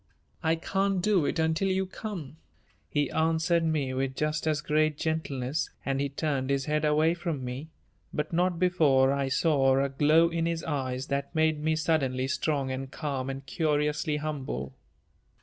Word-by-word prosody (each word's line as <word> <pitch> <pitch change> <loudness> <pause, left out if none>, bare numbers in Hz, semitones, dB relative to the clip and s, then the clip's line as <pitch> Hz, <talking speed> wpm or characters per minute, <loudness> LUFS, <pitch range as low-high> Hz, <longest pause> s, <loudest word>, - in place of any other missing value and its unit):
"I 160 -1 +2
can't 195 +3 0
do 185 -4 +2
it - - -1
until 160 +4 +1
you 190 0 +1
come," 185 -6 -7 0.5
he 145 -2 0
answered 165 +1 +2
me 150 -5 0
with 130 0 -2
just 155 +2 -1
as 155 -1 +2
great 155 0 +1
gentleness 150 -3 -2 0.2
and 135 0 0
he 140 - 0
turned 140 -2 -2
his 140 -1 +1
head 150 0 0
away 155 +2 +3
from 165 -6 -3
me, 130 +5 -6 0.4
but 150 +2 -3
not 175 +1 +2
before 150 -7 +4
I 140 -1 0
saw 135 -2 +3
a 140 - 0
glow 155 +5 +4
in 165 0 -1
his 165 -1 -2
eyes 130 -4 -2
that 140 +3 -2
made 155 -1 +2
me 160 0 +2
suddenly 135 -5 0
strong 140 -1 -1
and 130 0 -4
calm 135 -3 -3
and 135 0 -6
curiously 150 +1 0
humble. 130 - -4
150 Hz, 165 wpm, -28 LUFS, 135-160 Hz, 0.5 s, before